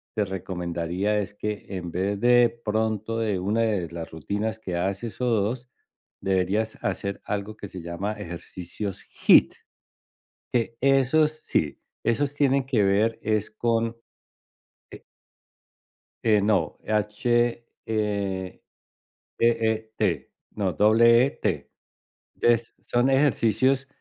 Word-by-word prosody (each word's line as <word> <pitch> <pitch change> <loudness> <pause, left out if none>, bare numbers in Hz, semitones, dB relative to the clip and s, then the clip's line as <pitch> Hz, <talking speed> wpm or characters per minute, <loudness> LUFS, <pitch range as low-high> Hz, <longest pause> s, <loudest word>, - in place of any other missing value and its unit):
te 105 - +1
recomendaría 90 +1 -2
es 100 0 -5
que, 105 0 -4
en 90 -3 -5
vez 100 +3 -1
de 120 0 +5 0.2
pronto 110 +1 -1
de 105 -4 0
una 105 +5 0
de 100 -7 0
las 85 -1 -6
rutinas 105 +8 -3
que 95 -5 -5
haces, 95 +6 -3
o - - +1
2, 120 +2 0 0.5
deberías 95 +4 0
hacer 100 0 -2
algo 105 +1 -3
que 100 - -7
se 95 -2 -8
llama 95 +5 -3
ejercicios 90 +1 -7
HIIT. - - +4 1.0
Que 115 -1 0
esos 135 +3 +4
sí. 80 - -1 0.3
Esos 140 +5 0
tienen 140 -2 +2
que 125 -5 +1
ver 105 +4 +2
es 110 -1 0
con, 115 +1 0 1.0
eh - - -11 1.2
eh, 105 -2 +4
no, 105 -1 +1
H, 115 +3 +1 0.2
eh, 100 -4 -2 0.8
E-E-T. 110 -1 0 0.2
No, 100 -3 -1
doble 115 +5 +6
E-T. 140 - -2 0.7
Es 120 -1 +2
son 120 +2 +2
ejercicios 135 0 +2
110 Hz, 115 wpm, -25 LUFS, 100-115 Hz, 1.2 s, doble